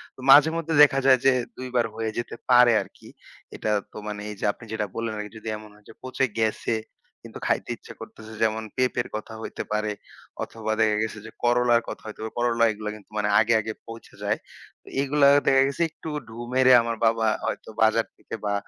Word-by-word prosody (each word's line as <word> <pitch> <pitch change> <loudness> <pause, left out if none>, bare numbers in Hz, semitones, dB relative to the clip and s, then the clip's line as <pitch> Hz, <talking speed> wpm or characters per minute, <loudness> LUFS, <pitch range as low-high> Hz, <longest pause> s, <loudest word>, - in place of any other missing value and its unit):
তো - - -20
মাঝে-মধ্যে 160 +3 +5
দেখা 135 -2 +4
যায় 130 -1 +6
যে, 135 - +7 0.3
২ 130 - -6
বার 120 -1 +3
হয়ে 110 -1 -2
যেতে 120 - -4
পারে 125 -1 +7
আরকি। - - -13 0.5
এটা 110 - -2 0.2
তো - - -11
মানে 105 -1 -5
এই 105 - -6
যে - - -2
আপনি 115 - -14
যেটা 110 -1 -1
বললেন 115 -1 -3
আরকি 105 0 -6
যদি 110 - -11
এমন 105 0 -12
হয় 105 0 -23
যে, - - -11
পচে 130 +1 0
গেছে, 110 +1 0 0.5
কিন্তু - - -11
খাইতে - - 0
ইচ্ছা - - -12
করতেছে। 110 0 -11
যেমন 110 0 0
পেঁপের 130 0 0
কথা 110 +1 -6
হইতে - - -5
পারে 105 0 0 0.5
অথবা 110 -1 -5
দেখা 110 -1 +3
গেছে 110 -1 -5
যে, 110 - -9
করলার 120 -1 +3
কথা - - -8
হইতে 110 - -9
পারে। 110 - -6
করলা 120 -1 +2
এগুলা 105 0 -5
কিন্তু 105 0 -17
মানে 105 0 0
আগে, 115 +1 +3
আগে 110 +1 -5
পোঁচে 115 0 -11
যায়। - - 0 0.6
এগুলা 140 +1 +3 0.2
দেখা 135 0 +5
গেছে 140 +3 -4
একটু 160 +1 -9 0.2
ঢু 110 - -11 0.2
মেরে 130 0 +5
আমার 115 0 -2
বাবা 115 0 +2 0.2
হয়তো - - -4
বাজার 110 +1 +4
থেকে - - -8
বা 100 - 0
115 Hz, 200 wpm, -25 LUFS, 110-125 Hz, 0.6 s, যে